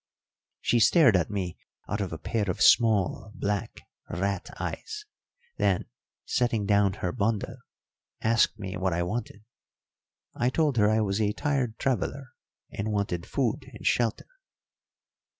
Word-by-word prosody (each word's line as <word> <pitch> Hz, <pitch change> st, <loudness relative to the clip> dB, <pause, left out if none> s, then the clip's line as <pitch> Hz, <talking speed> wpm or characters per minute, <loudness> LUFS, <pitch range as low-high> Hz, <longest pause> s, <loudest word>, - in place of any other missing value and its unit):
She 120 Hz, -, +2 dB
stared 125 Hz, -, +6 dB
at 90 Hz, -3 st, +2 dB
me 95 Hz, -4 st, -3 dB, 0.3 s
out 105 Hz, +1 st, -2 dB
of 95 Hz, -, -3 dB
a 80 Hz, -, -4 dB
pair 105 Hz, +5 st, -2 dB
of 90 Hz, -, -2 dB
small 110 Hz, -3 st, +4 dB
black 100 Hz, -1 st, -2 dB, 0.3 s
rat 100 Hz, +1 st, -2 dB
eyes, 425 Hz, -1 st, -5 dB, 0.5 s
then, -, -, +1 dB, 0.4 s
setting 120 Hz, -4 st, +1 dB
down 100 Hz, -1 st, +3 dB
her 90 Hz, -3 st, -3 dB
bundle, 110 Hz, +5 st, -1 dB, 0.6 s
asked 115 Hz, 0 st, +2 dB
me 95 Hz, -2 st, -5 dB
what 95 Hz, -1 st, 0 dB
I 85 Hz, +1 st, 0 dB
wanted. 105 Hz, +2 st, -4 dB, 0.9 s
I 120 Hz, -, +1 dB
told 145 Hz, -2 st, +1 dB
her 105 Hz, -1 st, +5 dB
I 110 Hz, +1 st, +3 dB
was 100 Hz, 0 st, 0 dB
a 105 Hz, -1 st, +1 dB
tired 130 Hz, -5 st, -1 dB
traveller, 135 Hz, 0 st, -1 dB, 0.4 s
and 105 Hz, +2 st, -3 dB
wanted 100 Hz, -5 st, -2 dB
food -, -, -1 dB
and -, -, -11 dB
shelter. 115 Hz, -3 st, +1 dB
105 Hz, 140 wpm, -27 LUFS, 100-120 Hz, 0.9 s, stared